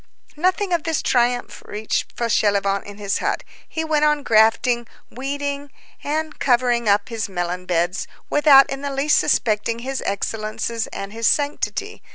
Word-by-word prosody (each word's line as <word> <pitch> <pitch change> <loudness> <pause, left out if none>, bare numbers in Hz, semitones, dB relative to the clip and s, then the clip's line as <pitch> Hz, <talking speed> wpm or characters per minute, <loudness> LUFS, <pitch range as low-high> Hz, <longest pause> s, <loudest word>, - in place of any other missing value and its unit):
Nothing 370 +4 +1
of 340 - +2
this 325 -1 -1
triumph 245 0 0
reached 215 +1 -3
Fauchelevent 200 -4 +1
in 205 0 -10
his 200 -1 -1
hut; - - -1 0.3
he 320 - -3
went 310 -1 +1
on 300 -1 +2
grafting, 230 +1 +3 0.2
weeding, 285 +2 -4 0.3
and 310 +1 -3
covering 240 -3 +2
up 200 +4 +2
his 225 -3 -3
melon 180 0 -3
beds, 175 +1 0 0.2
without 290 -2 +6
in 270 0 -4
the 285 - -3
least 275 +2 +2
suspecting 220 +1 +1
his 270 0 -3
excellences 215 +3 -2
and 195 +1 -7
his 230 0 0
sanctity. 290 0 -1
240 Hz, 150 wpm, -21 LUFS, 210-285 Hz, 0.3 s, without